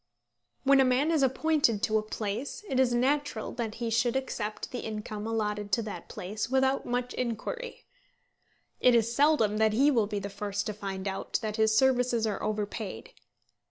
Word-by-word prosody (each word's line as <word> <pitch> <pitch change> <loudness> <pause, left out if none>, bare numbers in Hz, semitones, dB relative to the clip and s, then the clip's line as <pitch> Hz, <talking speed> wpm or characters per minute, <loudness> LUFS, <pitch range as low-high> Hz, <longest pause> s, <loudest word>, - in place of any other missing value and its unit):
When 275 0 +5
a - - +6
man 260 +5 +2
is 315 -3 +2
appointed 265 -4 +2
to 220 0 +3
a - - -2
place, 215 - -4
it 265 -7 0
is 260 -2 +4
natural 260 -1 0
that 230 -3 -4
he 230 -1 -3
should 235 +2 +2
accept 215 -5 -3
the 250 - -4
income 215 0 -5
allotted 210 -2 -2
to 230 - +3
that 205 -5 -7
place 210 +5 -4
without 265 +1 +1
much 245 0 -2
inquiry. 255 - -4 0.9
It 250 -1 +5
is 230 0 +2
seldom 280 -7 +3
that 220 0 +3
he 275 +6 +4
will 225 -6 +2
be 210 0 -3
the 200 0 -3
first 205 0 -3
to 210 - -2
find 195 -1 -5
out 195 0 -2
that 215 0 -3
his 220 0 +3
services 250 -2 +3
are 210 -2 -2
overpaid. 215 - -4
225 Hz, 180 wpm, -29 LUFS, 210-260 Hz, 0.9 s, a